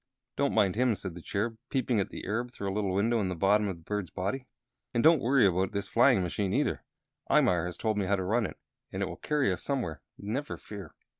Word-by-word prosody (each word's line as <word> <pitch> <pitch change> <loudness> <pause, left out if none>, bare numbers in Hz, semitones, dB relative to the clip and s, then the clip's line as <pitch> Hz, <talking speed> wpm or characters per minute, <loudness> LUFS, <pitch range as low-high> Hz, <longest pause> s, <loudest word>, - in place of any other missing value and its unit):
"Don't 140 0 +1
mind 100 -4 +3
him," 120 -1 +2
said 95 -2 -6
the 90 - -9
Cherub, 110 +5 -2
peeping 125 -4 +1
at 100 - -1
the - - -7
Arab 115 +5 -1
through 100 -5 -5
a 95 - -1
little 100 -2 0
window 115 +4 +2
in 95 - 0
the 90 - -2
bottom 105 +4 +3
of 95 -3 -3
the 85 - -18
bird's 105 0 -3
body. 125 +8 -3 0.5
"And 120 - +2
don't 160 -2 +6
worry 125 -1 +4
about 95 +2 +1
this 100 -1 -2
flying 120 -3 +4
machine, 95 +2 -1
either. - - 0 0.5
Imar 90 -1 +3
has 90 - -6
told 110 -2 0
me 95 - 0
how 100 - +3
to 95 - -2
run 110 +3 +1
it, - - -11 0.3
and - - -2
it - - +1
will - - -6
carry 145 -10 +1
us - - -6
somewhere, 120 - -2 0.2
never 125 +9 -4
fear. 100 -2 -9
105 Hz, 240 wpm, -29 LUFS, 95-120 Hz, 0.5 s, don't